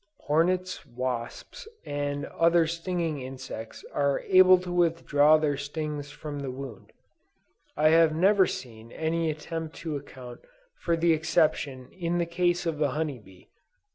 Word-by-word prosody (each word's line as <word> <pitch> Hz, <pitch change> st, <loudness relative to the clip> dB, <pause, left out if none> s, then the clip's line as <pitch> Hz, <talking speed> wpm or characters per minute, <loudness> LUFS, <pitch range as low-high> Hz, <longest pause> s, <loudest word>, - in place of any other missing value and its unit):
Hornets, 180 Hz, +4 st, 0 dB
wasps 125 Hz, -, -5 dB, 0.2 s
and 145 Hz, 0 st, -3 dB
other 170 Hz, 0 st, +3 dB
stinging 165 Hz, -2 st, -2 dB
insects 130 Hz, -3 st, -8 dB
are 140 Hz, -1 st, +1 dB
able 185 Hz, -1 st, +6 dB
to 180 Hz, 0 st, -6 dB
withdraw 160 Hz, -3 st, +4 dB
their 150 Hz, -2 st, 0 dB
stings 145 Hz, 0 st, -4 dB
from 145 Hz, 0 st, -7 dB
the 140 Hz, -1 st, -4 dB
wound. 130 Hz, -4 st, -8 dB, 0.9 s
I 155 Hz, +1 st, +5 dB
have 160 Hz, -1 st, +5 dB
never 190 Hz, +3 st, +4 dB
seen 115 Hz, -2 st, -8 dB
any 160 Hz, +1 st, -1 dB
attempt 160 Hz, +1 st, -5 dB
to 155 Hz, -2 st, -2 dB
account 130 Hz, -3 st, -9 dB, 0.4 s
for 170 Hz, -, -1 dB
the 165 Hz, 0 st, +3 dB
exception 150 Hz, -4 st, 0 dB
in 175 Hz, -1 st, -2 dB
the 170 Hz, -, +1 dB
case 175 Hz, +1 st, 0 dB
of 160 Hz, -3 st, -2 dB
the 150 Hz, -2 st, +2 dB
honey 150 Hz, -5 st, -2 dB
bee. 95 Hz, -3 st, -19 dB
155 Hz, 140 wpm, -27 LUFS, 140-170 Hz, 0.9 s, able